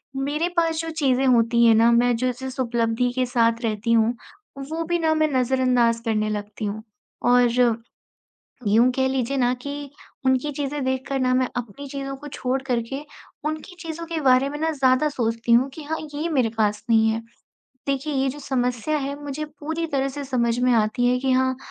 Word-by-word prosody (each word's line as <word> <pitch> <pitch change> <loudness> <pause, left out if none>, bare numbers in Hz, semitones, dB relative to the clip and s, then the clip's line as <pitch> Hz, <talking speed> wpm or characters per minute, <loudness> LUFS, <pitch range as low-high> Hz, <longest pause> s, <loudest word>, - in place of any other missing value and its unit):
मेरे 290 +5 -1
पास 330 -1 +2
जो 325 - -5
चीज़ें 265 -2 +2
होती 235 -1 +4
हैं 230 - +7
ना, 230 +1 +5
मैं 240 +1 +3
जो 250 +2 0
जिस 265 0 -6
उपलब्धि 235 0 0
के 255 -1 +1
साथ 230 -2 +1
रहती 220 0 -1
हूँ, 225 +1 +3 0.6
वो 325 +1 -2
भी 345 +1 0
ना, 320 -1 +2
मैं 310 0 +2
नज़रअंदाज 250 -2 +2
करने 215 -1 0
लगती 210 0 -4
हूँ। 210 +1 -4 0.5
और 245 -1 +4 0.9
यूँ 230 +5 +5
कह 265 0 +2
लीजिए 265 0 -1
ना 245 -2 +2
कि 285 0 -6 0.4
उनकी 260 +3 +2
चीज़ें 285 0 -3
देखकर 260 +1 -1
ना, 255 0 +2
मैं 255 0 +2
अपनी 245 +4 -5
चीज़ों 275 0 -5
को 290 +2 -10
छोड़ 265 -1 -2
कर 250 -3 0
के 275 +2 -5 0.4
उनकी 310 +4 -6
चीज़ों 330 0 -6
के 330 -1 -3
बारे 260 -1 +4
में 295 +1 -5
ना, 320 +1 0
ज़्यादा 265 0 +3
सोचती 235 -3 -1
हूँ 245 +3 +5
कि 315 - -8
हाँ, 320 +2 -3 0.2
ये 305 +3 -2
मेरे 265 -8 +2
पास 210 -1 +1
नहीं 225 -1 +5
है। 225 +1 -2 0.6
देखिए, 275 +2 -1
ये 270 0 +1
जो 275 +3 -5
समस्या 250 +1 -1
है, 280 0 -3
मुझे 290 +2 -4
पूरी 310 +2 -4
तरह 275 -3 0
से 285 +1 -6
समझ 240 -3 0
में 250 0 +3
आती 225 +2 +2
है 250 +1 +3
कि 265 0 +1
हाँ, 260 0 +2
260 Hz, 195 wpm, -23 LUFS, 235-285 Hz, 0.9 s, हैं